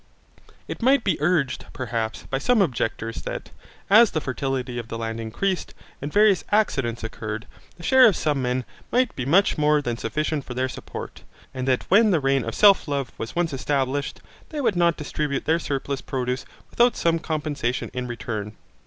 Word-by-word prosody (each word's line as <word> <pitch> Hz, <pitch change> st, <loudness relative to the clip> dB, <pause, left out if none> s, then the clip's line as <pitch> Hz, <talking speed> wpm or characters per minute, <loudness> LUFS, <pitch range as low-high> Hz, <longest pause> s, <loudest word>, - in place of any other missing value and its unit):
It -, -, -6 dB
might 260 Hz, +1 st, +4 dB
be 185 Hz, -7 st, 0 dB
urged 150 Hz, -5 st, +1 dB
perhaps 115 Hz, -3 st, -3 dB
by 135 Hz, -, -3 dB
some 245 Hz, -, +3 dB
objectors 115 Hz, -, -1 dB
that, -, -, -6 dB, 0.4 s
as 220 Hz, +3 st, +7 dB
the 155 Hz, -, -1 dB
fertility 130 Hz, -3 st, -3 dB
of 115 Hz, -, -7 dB
the 115 Hz, -, -5 dB
land 115 Hz, 0 st, -4 dB
increased, 180 Hz, -, -2 dB, 0.3 s
and 145 Hz, +2 st, -4 dB
various 205 Hz, -1 st, +4 dB
accidents 135 Hz, -, +1 dB
occurred, 110 Hz, 0 st, -5 dB, 0.3 s
the 170 Hz, -, -13 dB
share 260 Hz, +5 st, +7 dB
of 205 Hz, -, +3 dB
some 145 Hz, -3 st, 0 dB
men 125 Hz, 0 st, -1 dB, 0.3 s
might 250 Hz, +1 st, +2 dB
be 130 Hz, -1 st, -3 dB
much 180 Hz, +2 st, +3 dB
more 150 Hz, 0 st, +4 dB
than 120 Hz, -5 st, -3 dB
sufficient 150 Hz, +6 st, -2 dB
for 125 Hz, -, -8 dB
their 130 Hz, +1 st, 0 dB
support, -, -, -8 dB, 0.3 s
and 130 Hz, 0 st, -4 dB
that 130 Hz, -1 st, +2 dB
when 215 Hz, +4 st, +6 dB
the 175 Hz, -5 st, +3 dB
reign 135 Hz, -2 st, +1 dB
of 115 Hz, -, -4 dB
self 200 Hz, -4 st, +6 dB
love 140 Hz, -4 st, -2 dB
was 115 Hz, -, -5 dB
once 170 Hz, -3 st, 0 dB
established, 135 Hz, +1 st, -1 dB, 0.3 s
they 305 Hz, -, -5 dB
would 230 Hz, -8 st, +1 dB
not 170 Hz, -1 st, +3 dB
distribute 150 Hz, -2 st, -3 dB
their 165 Hz, +1 st, +2 dB
surplus 140 Hz, -3 st, -3 dB
produce 125 Hz, 0 st, -3 dB, 0.3 s
without 240 Hz, 0 st, +3 dB
some 165 Hz, 0 st, +2 dB
compensation 150 Hz, -6 st, -2 dB
in 125 Hz, -1 st, -3 dB
return. 110 Hz, -3 st, -5 dB
140 Hz, 180 wpm, -24 LUFS, 125-175 Hz, 0.4 s, as